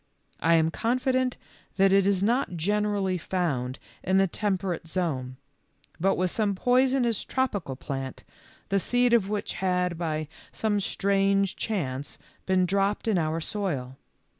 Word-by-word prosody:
I 165 +1 +4
am 160 0 +3
confident 255 +4 0 0.4
that 195 0 +4
it 195 0 +4
is 195 -1 +2
not 230 -4 +1
generally 200 0 0
found 140 -9 -2 0.2
in 190 +1 +2
the 195 - +5
temperate 190 -3 -2
zone, 135 -8 -2 0.6
but 195 +3 +2
was 185 -1 0
some 210 -3 0
poisonous 250 0 +2
tropical 205 - -1
plant, 135 0 -5 0.5
the 195 - +2
seed 245 +4 +2
of 210 -5 +3
which 210 -1 -2
had, 180 -2 0
by 155 -2 -2 0.2
some 210 -2 0
strange 195 0 +1
chance, 145 -10 -3 0.3
been 185 -1 +3
dropped 195 +4 0
in 205 -5 +3
our 160 0 0
soil. 150 -9 -3
190 Hz, 140 wpm, -27 LUFS, 165-210 Hz, 0.6 s, the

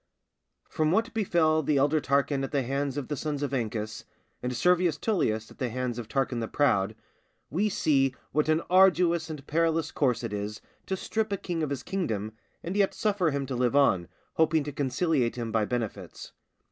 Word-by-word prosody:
_ - - -37
From 155 0 +2
what 225 +6 +1
befell 170 -7 +2
the 150 0 +1
elder 145 +3 +3
Tarquin 140 0 +1
at 135 - -4
the 140 -2 +1
hands 140 +2 -2
of 145 - -3
the 150 - -2
sons 145 0 -3
of 140 - -2
Ancus, 110 -3 -3 0.4
and 125 - -2
Servius 180 -3 +3
Tullius 130 - 0
at - - -17
the 130 -3 -1
hands 125 0 -3
of 115 - -6
Tarquin 135 -1 -1
the 115 - -2
Proud, 110 -8 +1 0.6
we 200 +8 +1
see 135 -8 +2 0.2
what 150 +1 +1
an 155 +1 +2
arduous 180 -3 +4
and 150 -3 -7
perilous 165 +1 +1
course 125 -4 +1
it 115 - -4
is 105 +1 -4 0.3
to 190 - -1
strip 220 +2 -2
a 200 - 0
king 175 -3 -3
of 155 - -1
his 135 -3 -4
kingdom 110 - -2 0.3
and 175 +3 -4
yet 200 -1 +2
suffer 200 -6 +1
him 140 -1 -2
to 130 -1 -4
live 125 +1 +1
on, 95 -12 +3 0.3
hoping 160 -1 +3
to 145 - -5
conciliate 140 -1 0
him 115 -2 -4
by 110 -1 +2
benefits. 105 -6 -5
145 Hz, 195 wpm, -28 LUFS, 125-165 Hz, 0.6 s, arduous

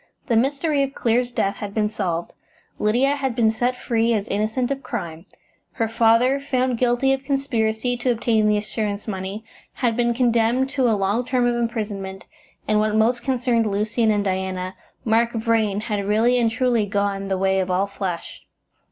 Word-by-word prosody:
The 235 - +1
mystery 280 +5 +1
of 275 0 -2
Clear's 240 +1 +1
death 200 -4 -1
had 205 -1 -6
been 215 -1 +2
solved; 175 -5 -3 0.5
Lydia 250 +7 +2
had 265 -4 -2
been 225 -3 +3
set 245 +3 0
free 230 -1 0
as 205 -1 -2
innocent 220 +5 -1
of 275 0 -2
crime; 170 -8 -6 0.5
her 225 -3 -1
father, 230 +4 +3
found 255 -3 -1
guilty 250 +2 +2
of 270 0 -3
conspiracy 245 -4 0
to 245 +1 0
obtain 220 -2 +1
the 210 0 +3
assurance 210 0 -3
money, 195 +2 -5 0.3
had 235 -3 0
been 240 0 +1
condemned 240 +2 +2
to 260 -3 +2
a 215 - +2
long 200 +5 0
term 250 0 +1
of 240 - +2
imprisonment, 210 -5 -3 0.4
and, 215 0 +3
what 215 0 +1
most 235 +3 +2
concerned 245 -4 +1
Lucian 215 +3 0
and 205 -1 +2
Diana, 185 -1 -2 0.3
Mark 230 +1 +2
Vrain 220 -3 +1
had 210 -2 -2
really 225 +5 +2
and 230 -1 +3
truly 235 -2 +1
gone 200 -1 -1
the 190 -1 -1
way 190 0 +1
of 185 -1 -1
all 185 +2 +2
flesh. 195 -3 -5
225 Hz, 180 wpm, -22 LUFS, 205-245 Hz, 0.5 s, been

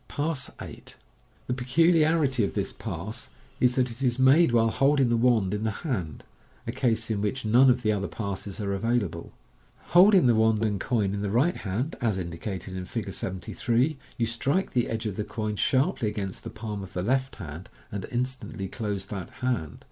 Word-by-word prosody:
Pass 145 -3 -1
8. - - -9 0.3
— - - -35
The 125 - -1
peculiarity 150 0 +3
of 100 - -2
this 100 -2 -1
pass 100 - -6 0.3
is, 125 0 +3
that 125 -2 +1
it 115 +3 -9
is 125 -2 +1
made 130 +3 +5
while 115 -1 +3
holding 135 0 +3
the 120 - +3
wand 115 -5 +3
in 105 +1 -2
the 110 - +1 0.2
hand, 95 - -3 0.4
a 115 - -2
case 115 -3 0
in 105 -2 -1
which 105 +4 -2
none 125 +5 +6
of 125 0 +2
the 110 - +3
other 100 -1 -1
passes 100 -1 -5
are 100 -2 -1
available. 100 -5 -1 0.6
Holding 185 -1 +7
the 120 - +5
wand 110 0 +3
and 105 -2 0
coin 105 -3 0
in 100 - -3
the 100 - -1
right 130 - +2
hand, 110 - -3
as 110 -5 +1
indicated 90 +1 -5
in 90 -1 -4
Fig. 100 -1 -4
73, 120 - -1 0.2
you 115 - +1
strike 135 - 0
the 120 -2 +1
edge 115 +1 -3
of 105 -3 -3
the 105 - -1
coin 105 0 -3
sharply 130 - +1
against 100 -3 -4
the - - -6
palm 110 -2 -6
of 95 - -9
the 90 - -2
left 130 +5 0
hand, 85 -1 -8 0.2
and 100 -2 -4
instantly 125 -5 -3
close 100 -2 -3
that 95 -4 -6 0.2
hand. 85 - -1
115 Hz, 195 wpm, -27 LUFS, 100-130 Hz, 0.6 s, Holding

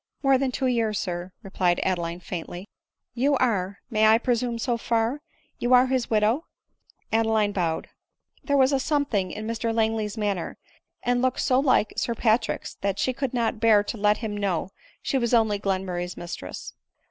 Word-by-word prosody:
u 270 - +2
More 265 -1 +5
than 265 -1 0
two 260 - -2
years, 230 -4 +1
sir," 180 -1 -4
replied 180 -3 0
Adeline 175 -2 -2
faintly. 175 +2 -6 0.2
" - - -62
You 280 +1 +3
are 200 -6 0
— - - -56
may 215 -1 +4
I 220 +1 +6
presume 240 0 -1
so 240 +1 0
far 230 +4 0 0.2
— - - -40
you 245 +1 +4
are 250 +1 +6
his 260 -2 -1
widow 220 +8 +1 0.2
?" - - -51
— - - -23
Adeline 220 -2 +2
bowed. 170 -5 -1 0.6
There 285 -1 +1
was 265 +1 +4
a 270 - +2
something 265 -10 0
in 215 +1 -6
Mr 230 0 -2
Langley's 220 -1 0
manner 200 -5 -2 0.5
and 245 0 +1
look 255 0 +1
so 255 0 +2
like 255 -6 +2
Sir 235 - -1
Patrick's, 225 0 0
that 200 -1 -1
she 255 - 0
could 270 0 -2
not 230 -2 0
bear 215 -2 +5
to 225 - -5
let 210 0 +3
him 215 -3 -4
know 195 -3 -1 0.3
she 270 - 0
was 235 0 +2
only 220 -3 +2
Glen 195 -1 -1
murray's 175 -1 -4
mistress. 170 - -7
220 Hz, 195 wpm, -25 LUFS, 200-245 Hz, 0.6 s, I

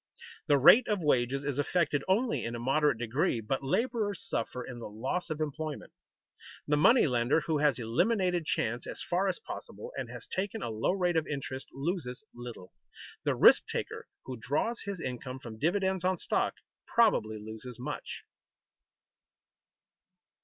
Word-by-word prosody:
The 145 - +5
rate 210 - +8
of 205 -5 0
wages 135 -1 +2
is 145 -1 -2
affected 145 -2 +1
only 225 +6 +1
in 115 +1 -3
a - - -5
moderate 140 +2 +2
degree, 120 +1 0
but 125 +5 -2
laborers 210 - 0
suffer 125 +2 -3
in 125 -1 -8
the 115 - -7
loss 130 +13 -3
of 155 -1 -3
employment. 155 0 -4 0.7
The 150 - +3
money 230 - +6
lender 125 +2 +2
who 155 -2 0
has 145 -4 +3
eliminated 175 - +1
chance 120 +2 -1
as - - -4
far 180 +3 +1
as - - 0
possible 470 +2 -8
and - - -4
has - - -8
taken 200 +3 -3
a 115 - -3
low 110 +10 0
rate 180 -3 +1
of 160 - 0
interest 135 -2 -4
loses 140 -2 -3
little; 120 -6 -9 0.5
the - - +2
risk - - +7
taker - - -4 0.2
who 130 -1 -6
draws 155 - -1
his 200 -3 -4
income 125 -1 -5
from 115 -4 -10
dividends 190 - +1
on 185 0 +2
stock - - 0 0.3
probably 160 - +3
loses 110 +3 -8
much. 125 - -6
145 Hz, 160 wpm, -30 LUFS, 125-185 Hz, 0.7 s, rate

